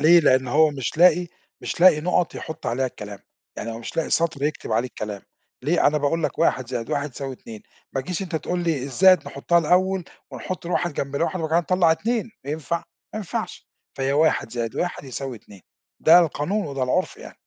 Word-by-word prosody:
ليه؟ 170 +3 +7
لأن 130 -3 +3
هو 155 +4 +4
مش 135 +1 -4
لاقي 175 0 +5 0.3
مش - - -5
لاقي 175 -4 +7
نُقط 180 +1 0
يحط 160 - -7
عليها 130 +2 0
الكلام، 105 -4 -8 0.4
يعني 115 - -4
هو 115 - -6
مش 115 - -8
لاقي 165 - -1
سطر 165 -4 0
يكتب 150 -6 -2
عليه 120 +3 +1
الكلام، 105 -4 -6 0.4
ليه؟ 155 +4 +2
أنا 150 +1 +3
باقول 155 +3 0
لك - - -2
1 130 -7 +1
زائد 120 -3 -4
1 145 0 -1
يساوي 135 +2 -6
2، 110 -3 -11 0.3
ما 135 - -1
تجيش 180 +7 -4
أنت 175 -3 -3
تقول 175 +3 -2
لي 160 -6 0
الزائد 180 +4 +4
نحطها 170 +5 +1
الأول 185 +3 +2 0.3
ونحط 185 -2 -6
ال1 175 -1 0
جنب 140 0 -3
ال1 170 +4 -1
وبعد 160 -1 -3
كده 185 - +1
نطلَّع 170 -3 +5
2، 225 +6 -2
ينفع؟ 155 +3 -2 0.4
ما - - -2
ينفعش، 200 -5 -5 0.3
فهي 135 0 0
1 155 -5 +2
زائد 115 -2 -3
1 175 -4 -2
يساوي 130 -1 -5
2، 100 -2 -16 0.4
ده 165 +2 +8
القانون 175 +4 -1
وده 135 -2 -3
العُرف 185 - 0
يعني. 465 - -12
155 Hz, 200 wpm, -23 LUFS, 130-175 Hz, 0.4 s, ده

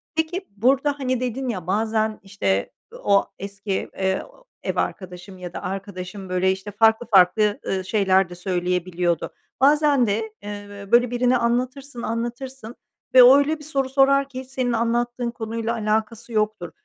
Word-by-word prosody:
Peki, 345 +4 -2
burada, 275 +6 +2
hani, 255 -2 0
dedin 255 +1 -3
ya 185 -7 -4
bazen, 220 +2 0
işte, 100 - -1 0.3
o 200 -1 +4
eski, 200 0 -4
eee, 190 0 0 0.4
ev - - -2
arkadaşım 185 0 -4
ya 180 -1 -8
da - - -6
arkadaşım, 190 0 -6
böyle, 185 +1 +2
işte, 190 +2 -5
farklı 220 +3 +3
farklı, 205 0 +4
ııı, 190 -1 -1
şeyler 190 -3 +2
de 175 - -9
söyleyebiliyordu. 180 -1 -1 0.3
Bazen 285 -2 +4
de, 220 +1 -2
eee, 205 -1 -8
böyle, 245 0 +5
birine 245 +1 +2
anlatırsın, 250 +2 -2
anlatırsın 240 +1 -5 0.4
ve 255 -1 +10
o 260 +3 +9
öyle 305 +2 +1
bir - - -11
soru 275 -3 -1
sorar 275 +1 +3
ki 260 -1 -7
senin 255 -2 -2
anlattığın 240 +1 0
konuyla 230 0 -3
alakası 220 +1 -2
yoktur. 210 -6 -1
220 Hz, 150 wpm, -23 LUFS, 195-255 Hz, 0.4 s, ve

